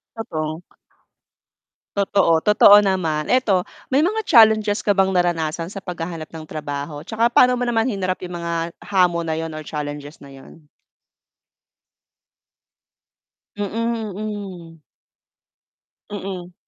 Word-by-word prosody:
Totoo. 160 -6 -4 1.3
Totoo, 195 -5 +2
totoo 205 +1 +7
naman. 170 -6 -1
'Eto, 220 -8 +3 0.3
may 275 - +4
mga 430 +7 0
challenges 215 -5 +5
ka 205 -2 +1
bang 190 0 +3
naranasan 170 -2 0
sa 200 - -9
paghahanap 170 -4 -6
ng 160 - -7
trabaho 145 0 -6
'tsaka 225 +3 +1
pa'no 250 +1 +5
mo 245 -1 -1
naman 225 -1 +1
hinarap 195 -6 -1
'yung 180 - -8
mga 170 0 -3
hamon 180 -3 +1
na 160 - -1
'yun 160 0 -4
or 155 - -6
challenges 145 0 -6
na 140 -1 -14
'yun? 140 +4 -15 2.9
Mm, 220 +1 -3
mm. 190 -6 -7 1.3
Mm. 185 -3 -6
185 Hz, 115 wpm, -21 LUFS, 160-210 Hz, 2.9 s, totoo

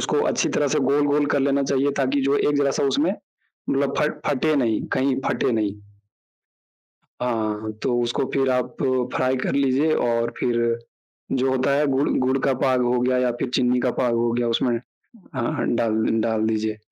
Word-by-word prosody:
उसको - - 0
अच्छी - - 0
तरह 145 - 0
से - - +2
गोल-गोल 145 0 +2
कर 140 - +2
लेना 140 0 +1
चाहिए 140 +1 +1
ताकि 135 +2 +1
जो 140 +1 +2
एक 145 0 +1
ज़रा-सा 140 0 +1
उसमें 295 +3 +2 0.6
मतलब 140 0 0
फट 150 0 -1
फटे 155 +3 +1
नहीं, 115 -5 +1
कहीं 130 0 +1
फटे - - 0
नहीं। 105 -3 0 1.5
हाँ, 125 -1 0 0.3
हाँ 110 0 -4
तो 120 -1 +1
उसको 120 +2 -1
फिर 135 -1 +1
आप 125 0 0 0.4
फ्राई 130 0 +1
कर 130 - -2
लीजिए 140 +3 +2
और 115 0 0
फिर 115 -1 +1 0.5
जो 130 0 +1
होता 130 +1 +1
है 150 +1 +2
गुड़ 135 +1 +1
गुड़ 130 +1 +1
का 135 - +3
पाग 130 0 +1
हो 120 0 +1
गया 125 0 +1
या 125 -1 +1
फिर - - -2
चीनी 125 0 +2
का 125 - 0
पाग 120 -1 0
हो 115 0 +1
गया 120 0 0
उसमें 120 +1 +1 0.6
हाँ, 120 -2 -1
हाँ, - - -2
डाल 110 -1 +1 0.2
डाल 110 -1 0
दीजिए। 110 -1 -1
130 Hz, 190 wpm, -23 LUFS, 120-140 Hz, 1.5 s, का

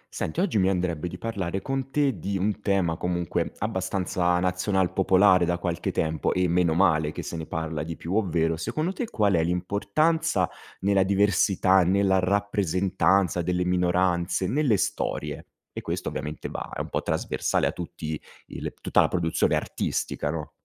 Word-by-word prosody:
Senti 80 - -2
oggi 180 - +1
mi 95 0 +3
andrebbe 90 -3 -1
di 90 - -7
parlare 95 -4 -3
con 135 0 -2
te 135 -7 +1
di 100 +4 -2
un 105 +2 -1
tema 95 -5 +1
comunque 85 -1 -1
abbastanza 95 -3 0
nazional 90 +1 0
popolare 95 -1 +5
da 85 0 +1
qualche 85 -1 -2
tempo 80 -1 0
e 90 0 +1
meno 85 -1 +2
male 80 -5 +3
che - - -6
se - - -5
ne 80 -1 -5
parla 80 -1 -3
di 80 +2 -5
più 85 - -5
ovvero, 85 -6 +1
secondo 155 - -2
te 225 +3 -4
qual 105 -3 +2
è 85 -2 +3
l'importanza 100 - +1 0.3
nella 100 0 +3
diversità, 95 -1 +3
nella 95 +1 +3
rappresentanza 95 -1 +1
delle 90 +1 0
minoranze, 90 0 +1
nelle 130 -3 +2
storie. 90 - -3 0.3
E - - -4
questo - - -3
ovviamente 75 +1 -5
va - - -6
è - - -5
un - - -6
po' - - -1
trasversale - - 0
a - - +1
tutti 80 -3 -6 0.3
il - - -5
tutta - - +3
la - - +3
produzione 80 -3 +1
artistica, 75 - -2
no? 75 -1 -4
90 Hz, 165 wpm, -26 LUFS, 85-100 Hz, 0.3 s, popolare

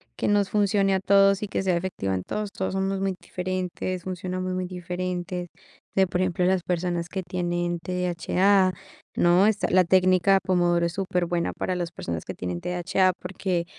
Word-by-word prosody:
Que - - -2
nos 205 -1 +2
funcione 200 -1 +2
a 190 - +2
todos 195 +1 +4
y - - -2
que 195 - -2
sea 185 -2 +2
efectiva 170 - -3
en 95 - -2
todos. 210 -1 -4
Todos 190 -1 -3
somos 195 0 -1
muy 195 -1 -1
diferentes, 185 0 -3
funcionamos 185 0 -3
muy 185 0 -2
diferentes. 180 0 -4
O - - -27
sea, 190 -1 +4
por 180 +1 -1
ejemplo, 180 -1 +1
las 185 0 +2
personas 175 -1 -2
que 190 -1 -4
tienen 175 -1 -2
TDHA, 185 +2 +2 0.4
¿no? 175 +3 +4
Esta, 215 -2 +1
la 185 0 +5
técnica 185 +1 +4
pomodoro 175 -2 +2
es 170 - -2
superbuena 180 -2 -1
para 185 - -2
las 175 -1 -3
personas 85 - -5
que - - -5
tienen 90 -1 -4
TDHA, 180 +1 +1
porque 180 -1 -2
185 Hz, 180 wpm, -25 LUFS, 175-190 Hz, 0.4 s, la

